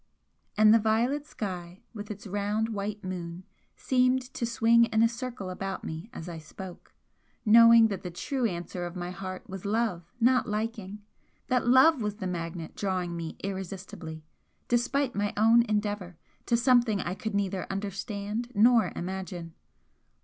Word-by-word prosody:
And 215 0 +7
the 230 - +6
violet 235 +7 +1
sky, 180 -3 -6
with 210 -2 -7
its 210 0 -7
round 205 +3 -1
white 205 -1 -4
moon, 180 -1 -5 0.3
seemed 255 0 +1
to 235 - -2
swing 235 0 +4
in 220 0 +2
a - - +6
circle 235 -5 -5
about 195 +1 -4
me 160 +7 -6
as 175 -9 -8
I 170 -2 -6
spoke 175 +3 -11 0.5
knowing 230 +1 +8
that 195 - -4
the 180 - -5
true 245 - -1
answer 175 -1 -4
of 175 - -9
my 175 0 -4
heart 185 0 -7
was 190 -1 -7
love, 205 -5 -1
not 250 +1 +3
liking! 210 -1 -4 0.5
that 250 -2 +1
love 260 +3 +6
was 210 -1 -2
the 205 -3 -6
magnet 170 -2 -5
drawing 185 -3 -2
me 165 -1 -5
irresistibly, 190 -4 -6 0.4
despite 250 +2 +1
my 205 0 -1
own 225 +2 +6
endeavour, 205 -5 -2 0.3
to 235 - +3
something 240 -4 +3
I 180 - -2
could 220 +1 -4
neither 195 -2 -1
understand 205 +3 -4
nor 225 -2 +5
imagine. 180 -2 -5
205 Hz, 155 wpm, -28 LUFS, 185-230 Hz, 0.5 s, knowing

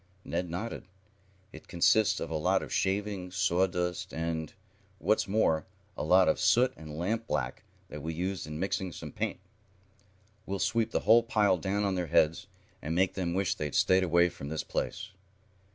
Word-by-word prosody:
Ned 90 - -2
nodded. 95 +3 -5 0.7
"It 80 - -12
consists 100 +5 +3
of - - -5
a - - -2
lot 90 +5 +1
of - - -7
shavings, 95 -2 -1
sawdust 90 -1 0
and, 80 -1 -3 0.5
what's 105 +5 +1
more, 95 -6 +1 0.3
a - - -5
lot 90 +4 +5
of - - +2
soot 120 +7 +4
and 80 -1 -9
lampblack 110 +7 -2 0.3
that 75 - -7
we 80 +3 -3
used 90 +1 -3
in 75 0 -6
mixing 95 0 -2
some - - -8
paint. - - -3 1.1
We'll 100 - -2
sweep 115 +3 +1
the - - -1
whole 115 +2 +6
pile 105 -5 +2
down 100 +3 -1
on 100 -1 +1
their 90 -2 -2
heads, 80 0 +2 0.3
and 80 +2 -3
make 95 +1 +2
them 85 -2 -2
wish 95 -1 +1
they'd 75 -2 -4
stayed 95 0 +4
away 85 0 +3
from 70 -3 -8
this 80 0 -3
place." - - -4
90 Hz, 170 wpm, -30 LUFS, 80-100 Hz, 1.1 s, whole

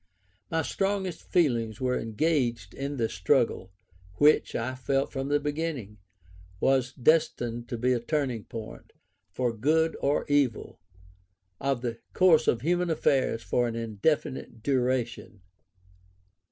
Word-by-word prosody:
My 160 -1 0
strongest 195 -1 -2
feelings 120 - +1
were 125 -1 0
engaged 120 - -1
in 140 +1 -4
this 115 -2 -1
struggle, 95 -1 +1 0.4
which, 150 +7 +4
I 120 +3 -2
felt 135 +2 -1
from 135 -1 -3
the 145 +1 +2
beginning, 145 -8 -4 0.6
was 130 +1 +2
destined 120 -5 +1
to 120 - -3
be 125 +2 +2
a 120 - 0
turning 130 -3 -2
point, 115 -1 -9 0.4
for 120 +5 -1
good 160 +8 +2
or 140 +1 +1
evil, 145 - 0 0.8
of 135 -3 -1
the 115 -1 -3
course 165 -4 +5
of 115 - +2
human 175 +4 +1
affairs 135 -7 +1
for 120 +6 +1
an 115 - -4
indefinite 115 +2 -2
duration. 125 -6 -1
130 Hz, 125 wpm, -28 LUFS, 115-150 Hz, 0.8 s, course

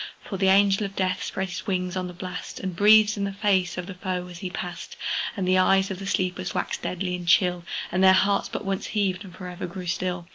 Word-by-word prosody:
For 195 - -4
the 190 0 +2
Angel 195 +1 +4
of 195 - -13
Death 185 0 0
spread 190 0 -3
his 180 0 -6
wings 180 -2 -1
on 185 -1 -2
the 180 - -8
blast, 180 0 -7
And 185 -2 -4
breathed 210 +2 +6
in 200 - -1
the 200 - -1
face 195 -4 +1
of 180 - -3
the 195 - -7
foe 180 -1 -3
as 170 - -9
he 185 - -4
passed; 180 -1 -6 0.4
And 190 -2 -1
the 185 0 +4
eyes 195 +1 +3
of 190 - -5
the 195 - -6
sleepers 185 -1 -1
waxed - - -2
deadly 180 0 -2
and 175 -1 -7
chill, 180 0 +3 0.3
And 185 +2 +1
their 190 0 +8
hearts 200 +1 +2
but - - -5
once 195 -1 -2
heaved, 200 -2 0
and 180 - -12
for 185 - -8
ever 180 0 -5
grew 180 +1 -7
still! 175 0 -2
185 Hz, 250 wpm, -25 LUFS, 180-195 Hz, 0.4 s, their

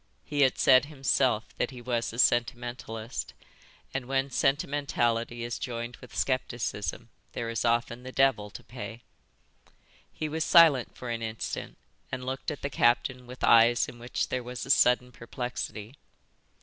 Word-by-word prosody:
He 145 -1 -1
had 130 -2 +4
said 130 +1 +6
himself 135 -5 0
that - - +1
he 130 -3 -10
was 120 -1 -2
a 115 - -9
sentimentalist, 120 -2 -1 0.6
and 130 -2 -3
when 135 +1 0
sentimentality 125 -5 0
is 120 0 -4
joined 120 -2 -5
with 125 - -14
scepticism 120 -5 -2 0.2
there 115 -1 -3
is 115 - -2
often 120 +1 +1
the 130 +1 -8
devil 130 -6 +2
to - - -11
pay. 120 0 -8 1.1
He 155 - -4
was 160 +1 -1
silent 160 -9 +5
for 125 -1 -5
an 115 0 -3
instant 110 0 -5 0.3
and 125 0 -4
looked 130 +1 -3
at 150 - -6
the 140 - -1
captain 125 +1 +2
with 125 +1 -10
eyes 115 +1 +6
in 120 - -10
which 120 +1 -2
there 130 - -1
was 125 0 -6
a 135 - 0
sudden 125 -1 +4
perplexity. 115 -2 -6
125 Hz, 155 wpm, -28 LUFS, 120-130 Hz, 1.1 s, said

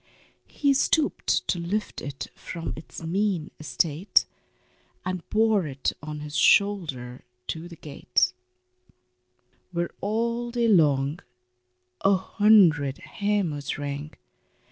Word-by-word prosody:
He 285 -1 +2
stooped 290 +3 +1
to 175 - 0
lift 195 +6 -3
it 140 -2 -5
from 165 -2 -6
its 160 +1 -10
mean 185 -1 -1
estate, 155 - +1 0.8
And 185 -1 -2
bore 215 -5 +3
it 135 -2 -2
on 150 0 -6
his 150 0 -7
shoulder 150 -12 +2 0.3
to 165 +1 -4
the 170 - -11
gate, 145 -5 0 1.4
Where 170 -1 -2
all 235 +3 -1
day 235 -1 +1
long 150 -6 +3 0.8
a 195 0 +5
hundred 185 -8 +4
hammers 200 -8 -2
rang. 145 +1 -5
170 Hz, 105 wpm, -26 LUFS, 150-205 Hz, 1.4 s, a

